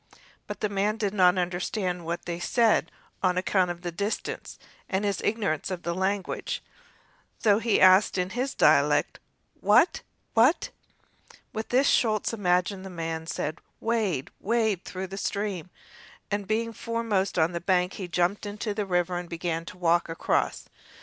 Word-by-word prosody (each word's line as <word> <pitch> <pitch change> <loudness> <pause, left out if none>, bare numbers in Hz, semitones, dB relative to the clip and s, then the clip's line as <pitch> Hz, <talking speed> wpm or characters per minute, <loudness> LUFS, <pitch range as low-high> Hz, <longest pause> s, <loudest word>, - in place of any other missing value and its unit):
But - - -7
the 210 - +2
man 205 +2 0
did 205 -2 -1
not 185 -2 +5
understand 180 0 -2
what 170 +1 -4
they 170 -1 -4
said 225 +5 +2 0.3
on 180 -1 +2
account 185 0 +2
of 175 0 -6
the 175 - -3
distance 200 +5 -4 0.3
and 190 +2 0
his 200 -1 -1
ignorance 205 -9 -1
of 180 -2 -4
their 170 - -1
language, 190 +2 -2 0.7
and - - -26
so 210 -2 +5
he 225 -1 +2
asked 185 +2 +6
in 180 +1 -1
his 255 +4 -2
dialect: - - +3 0.4
"Wat? - - +4 0.3
wat?" 245 +9 +3 0.8
With 220 0 -4
this 260 +3 +3
Schulz 220 -5 +2
imagined 185 -1 +1
the 190 - -7
man 165 -2 -4
said, 155 0 -3 0.2
"Wade, 215 - -1
wade 220 -4 +1
through 185 0 -5
the 195 +1 -7
stream"; 200 -4 -3 0.6
and, 205 -1 -2
being 230 +1 -1
foremost 225 -5 -1
on 160 +1 +3
the 170 -1 -4
bank, 180 0 +1
he 190 - -5
jumped 180 +4 0
into 210 +1 -3
the 205 -1 -3
river 175 -1 0
and 175 -1 -8
began 165 -1 -3
to 180 - -10
walk 170 -1 +2
across. 165 - -1
190 Hz, 165 wpm, -27 LUFS, 175-210 Hz, 0.8 s, asked